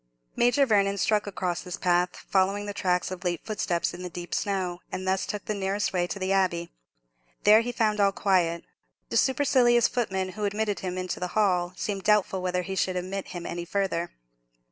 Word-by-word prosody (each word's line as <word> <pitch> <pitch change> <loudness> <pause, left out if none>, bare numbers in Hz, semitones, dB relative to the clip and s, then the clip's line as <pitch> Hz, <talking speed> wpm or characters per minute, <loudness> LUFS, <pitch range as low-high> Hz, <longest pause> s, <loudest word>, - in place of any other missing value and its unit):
Major 245 +4 +4
Vernon 200 -4 +2
struck 210 +1 +1
across 180 -3 -2
this 180 -1 -6
path, 180 0 +1
following 195 +2 0
the 205 - -4
tracks 180 -2 0
of 185 0 -6
late 175 -2 -1
footsteps 200 -5 -1
in 175 - -8
the 180 - -5
deep 175 0 -7
snow, 185 -3 -1
and 185 0 -4
thus 190 0 0
took 210 - -4
the 215 - -1
nearest 200 0 -1
way 175 -1 +1
to 200 - -4
the 190 0 -2
Abbey. 175 -3 +1 0.7
There 215 +2 +7
he 245 +1 -3
found 215 -3 +1
all 200 -1 +5
very - - -13
quiet. 175 -4 +2 0.5
The - - 0
supercilious 255 -3 +4
footman 190 -6 -1
who 210 +2 -4
admitted 205 0 -1
him 185 0 -3
to - - -3
the 180 - -2
hall 180 -4 +2
seemed 200 -2 -3
doubtful 205 -2 +2
whether 180 0 -1
he 190 +1 -4
should 185 0 0
admit 185 +2 -4
him 175 -1 -7
any 175 0 -4
farther. 175 -2 -1
190 Hz, 200 wpm, -27 LUFS, 180-205 Hz, 0.7 s, There